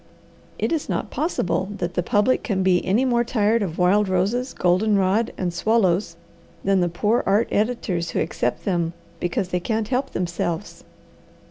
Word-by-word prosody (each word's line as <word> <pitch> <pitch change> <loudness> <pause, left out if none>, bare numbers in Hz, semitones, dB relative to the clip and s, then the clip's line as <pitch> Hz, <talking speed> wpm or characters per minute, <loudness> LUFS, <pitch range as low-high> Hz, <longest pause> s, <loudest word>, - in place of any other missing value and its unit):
"It - - -1
is 320 -3 -1
not - - -2
possible 190 - -1
that 175 0 -3
the 175 - 0
public 210 +6 +2
can 190 -5 -1
be 185 -1 +3
any 225 +8 +2
more 240 -2 +2
tired 230 -1 +1
of 175 -5 -3
wild 190 +3 +3
roses, 205 +8 0
golden 195 +4 +2
rod, 200 +4 +1
and 180 -2 -2
swallows 190 -4 +1 0.5
than 195 -1 +3
the 175 -1 +1
poor 210 +7 +1
art 205 +4 +3
editors 205 -6 -1
who - - -2
accept 120 - -2
them 170 -3 0 0.3
because 175 +1 -1
they 180 - 0
can't 220 +3 -2
help 255 +1 0
themselves. 175 +1 -3
195 Hz, 165 wpm, -23 LUFS, 180-225 Hz, 0.5 s, be